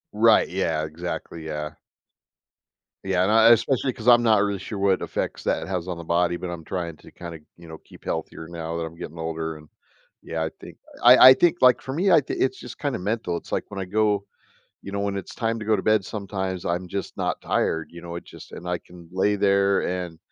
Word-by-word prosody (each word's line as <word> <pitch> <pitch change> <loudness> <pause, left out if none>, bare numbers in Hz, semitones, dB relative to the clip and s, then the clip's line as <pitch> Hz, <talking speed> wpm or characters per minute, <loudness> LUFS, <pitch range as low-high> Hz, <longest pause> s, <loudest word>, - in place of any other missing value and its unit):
Right, 110 +1 +5
yeah, 80 -4 -1
exactly, 85 +1 -6
yeah. 75 -1 -4 1.3
Yeah, 95 -1 +2
and 95 - +2
I, 110 +1 +7
especially 130 +3 +2
'cause 120 -2 -9
I'm 120 -1 +7
not 110 -3 +4
really 100 -1 -1
sure 100 +2 -6
what 95 -1 +2
effects - - -3
that - - -1
has 90 -2 -3
on 90 - -3
the 85 - -8
body, 85 +1 +1
but 90 0 -5
I'm 85 -2 -6
trying 85 -1 -4
to - - -16
kind 85 -1 -8
of, 80 - -12 0.2
you 85 -1 -14
know, 80 0 -9
keep - - -18
healthier 80 - -4
now 85 -1 -5
that 85 - -2
I'm 80 0 -9
getting 85 0 -8
older, 80 -1 -4
and 75 0 -15 0.5
yeah, 80 -1 -4
I - - -2
think - - -11 0.3
I 125 +1 +9
I - - +10
think 175 +5 +3
like 125 -1 +6
for 130 - -6
me, 185 +6 +2
I 165 - +7
think 135 - -4
it's 130 0 +1
just 125 - -10
kind 145 -4 -1
of - - -5
mental, 100 -3 -2
it's 85 - -8
like - - -1
when 100 - -6
I 95 - -3
go, 105 +1 +1 0.6
you 100 - -8
know 100 - -2
when 100 0 -1
it's 95 - -6
time 115 -1 -1
to 110 - -6
go 110 0 +3
to 95 - -4
bed, 110 -2 +3
sometimes, 95 -3 -4
I'm 90 +1 -2
just 100 +2 -5
not - - -2
tired, 80 -1 -1
you 85 0 -11
know, 85 0 -6
it's 85 - -10
just - - -13
and 90 - -8
I 90 - 0
can 85 -1 -15
lay 100 +3 +1
there 100 0 +3
and, 90 -2 -4
95 Hz, 240 wpm, -24 LUFS, 85-110 Hz, 1.3 s, I